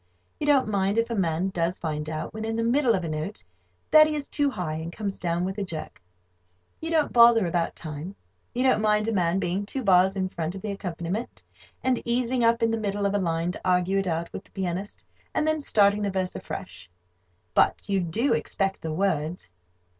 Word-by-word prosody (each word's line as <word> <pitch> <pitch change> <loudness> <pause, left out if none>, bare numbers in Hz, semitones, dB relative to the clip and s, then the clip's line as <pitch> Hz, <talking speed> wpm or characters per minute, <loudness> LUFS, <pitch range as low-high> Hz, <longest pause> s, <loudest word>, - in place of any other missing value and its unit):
You 295 - -2
don't 280 -5 +4
mind 200 0 0
if 230 +1 +1
a - - 0
man 175 -1 0
does 175 -1 -1
find 155 -2 -3
out, 155 0 -4
when 220 0 -5
in 225 0 -2
the 230 - 0
middle 240 0 +3
of 180 -3 -2
a - - -3
note, 155 +6 -4 0.5
that 310 0 +8
he 305 - -2
is 290 -2 -4
too 290 -1 +1
high, 180 - -3
and 160 +2 -5
comes 200 0 -4
down 175 0 0
with 190 +2 -4
a - - -1
jerk. 165 - -6 0.8
You 325 - -4
don't 320 -3 +1
bother 235 -3 +7
about 170 -1 -1
time. 155 +4 -7 0.4
You 250 - +1
don't 255 -4 +3
mind 210 0 +2
a - - +1
man 180 -3 +1
being 190 +1 -1
two 260 +6 -4
bars 190 -1 +4
in 190 -1 0
front 170 -1 -4
of 190 - -8
the 210 - -2
accompaniment, 185 +2 -5 0.4
and 260 -2 +1
easing 245 +1 0
up 230 0 +3
in 225 - +3
the 225 - -1
middle 205 -1 -1
of 200 - +1
a 205 - +2
line 165 -1 0
to - - -9
argue 185 +1 +2
it 195 - -2
out 165 0 -2
with 195 - -6
the - - -21
pianist, 190 +1 -4 0.3
and 305 - +1
then 310 -1 +1
starting 205 -5 +3
the 205 - 0
verse 185 -1 -2
afresh. 90 0 -7 0.6
But - - +2
you 195 -1 +1
do 200 - 0
expect 195 -1 -1
the 160 - -3
words. 160 - -1
195 Hz, 220 wpm, -26 LUFS, 170-225 Hz, 0.8 s, that